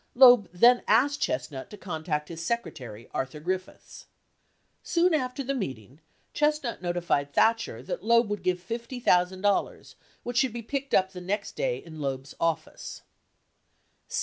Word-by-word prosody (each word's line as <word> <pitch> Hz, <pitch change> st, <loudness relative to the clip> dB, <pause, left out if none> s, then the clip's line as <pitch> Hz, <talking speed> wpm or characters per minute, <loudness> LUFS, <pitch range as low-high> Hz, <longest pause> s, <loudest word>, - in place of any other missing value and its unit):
Loeb 245 Hz, -5 st, +8 dB
then 240 Hz, +8 st, +6 dB
asked 280 Hz, +6 st, +3 dB
Chestnut 130 Hz, +1 st, -2 dB
to 210 Hz, -, -10 dB
contact 155 Hz, -5 st, -3 dB
his 165 Hz, -1 st, -6 dB
secretary, 130 Hz, -, -4 dB
Arthur 135 Hz, +3 st, -3 dB
Griffiths. 185 Hz, +4 st, -5 dB, 0.7 s
Soon 350 Hz, 0 st, +2 dB
after 260 Hz, -2 st, -1 dB
the 275 Hz, +2 st, -1 dB
meeting 135 Hz, -, -5 dB, 0.3 s
Chestnut 300 Hz, -6 st, 0 dB
notified 175 Hz, -5 st, 0 dB
Thatcher 220 Hz, -, +2 dB
that 175 Hz, -, -5 dB
Loeb 235 Hz, +1 st, +4 dB
would 205 Hz, -2 st, -2 dB
give 180 Hz, 0 st, +1 dB
$50,000 200 Hz, -3 st, 0 dB, 0.3 s
which 245 Hz, 0 st, -4 dB
should 255 Hz, -2 st, +2 dB
be 235 Hz, -1 st, -5 dB
picked 275 Hz, +4 st, -2 dB
up 190 Hz, 0 st, +3 dB
the 180 Hz, -2 st, -8 dB
next 200 Hz, +3 st, -2 dB
day -, -, 0 dB
in 160 Hz, -1 st, -11 dB
Loeb's 135 Hz, 0 st, -4 dB
office. 165 Hz, -1 st, -3 dB
190 Hz, 140 wpm, -27 LUFS, 160-245 Hz, 0.7 s, Loeb